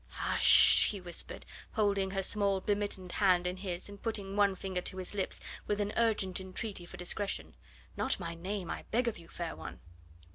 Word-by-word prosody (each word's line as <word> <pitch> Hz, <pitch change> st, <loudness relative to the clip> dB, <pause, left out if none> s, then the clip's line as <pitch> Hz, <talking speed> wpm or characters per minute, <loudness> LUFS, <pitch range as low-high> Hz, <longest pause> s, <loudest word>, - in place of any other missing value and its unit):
"Hush -, -, -2 dB
sh -, -, +6 dB, 0.4 s
sh!" -, -, 0 dB
he 200 Hz, -, -5 dB
whispered, 175 Hz, -2 st, -5 dB, 0.3 s
holding 200 Hz, -3 st, +1 dB
her 195 Hz, 0 st, -2 dB
small 200 Hz, 0 st, +1 dB
bemittened 200 Hz, -2 st, -2 dB
hand 180 Hz, -3 st, +3 dB
in 180 Hz, +1 st, -2 dB
his, 185 Hz, -2 st, -3 dB
and 200 Hz, -1 st, -11 dB
putting 200 Hz, -4 st, -3 dB
one 200 Hz, -2 st, +3 dB
finger 185 Hz, -1 st, -3 dB
to 190 Hz, -, -4 dB
his 185 Hz, +1 st, -5 dB
lips 195 Hz, -2 st, -1 dB, 0.3 s
with 205 Hz, 0 st, 0 dB
an 205 Hz, 0 st, -1 dB
urgent 205 Hz, -5 st, +2 dB
entreaty 190 Hz, -1 st, -5 dB
for -, -, -10 dB
discretion; 195 Hz, +3 st, -3 dB, 0.4 s
"not -, -, 0 dB
my 170 Hz, -2 st, -4 dB
name, 185 Hz, +2 st, -4 dB
I -, -, -6 dB
beg 245 Hz, +2 st, +1 dB
of 225 Hz, -, -2 dB
you, 165 Hz, -, -14 dB
fair 170 Hz, -1 st, -5 dB
one." -, -, -8 dB
195 Hz, 195 wpm, -32 LUFS, 180-205 Hz, 0.4 s, sh